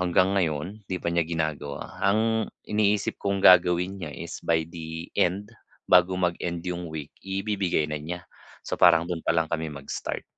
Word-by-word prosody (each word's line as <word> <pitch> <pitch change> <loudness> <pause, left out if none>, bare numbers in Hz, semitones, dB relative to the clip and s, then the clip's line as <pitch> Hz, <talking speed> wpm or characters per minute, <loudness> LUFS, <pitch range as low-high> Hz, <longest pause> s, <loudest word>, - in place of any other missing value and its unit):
hanggang 90 +1 +3
ngayon 85 +6 -2
'di 95 - -1
pa 85 -1 -2
niya 85 - +3
ginagawa. 75 -4 -3
Ang 110 +2 +2 0.2
iniisip 105 -1 +1
kong 100 -1 -1
gagawin 90 +1 +5
niya 85 - -4
is 85 0 -7
by 80 -1 +1
the 80 0 -7
end, 100 +5 0 0.3
bago 90 0 +4
mag-end 85 -1 -2
yung 90 -1 -4
week 80 -2 -7
ibibigay 95 -4 -1
na 75 -1 -4
niya, 85 +3 -6 0.4
so - - -9
parang 85 -1 +6
dun 85 -2 -4
pa 85 - 0
lang 80 0 0
kami 80 -1 -1
mag-start. 70 -1 -5
85 Hz, 170 wpm, -26 LUFS, 80-95 Hz, 0.4 s, parang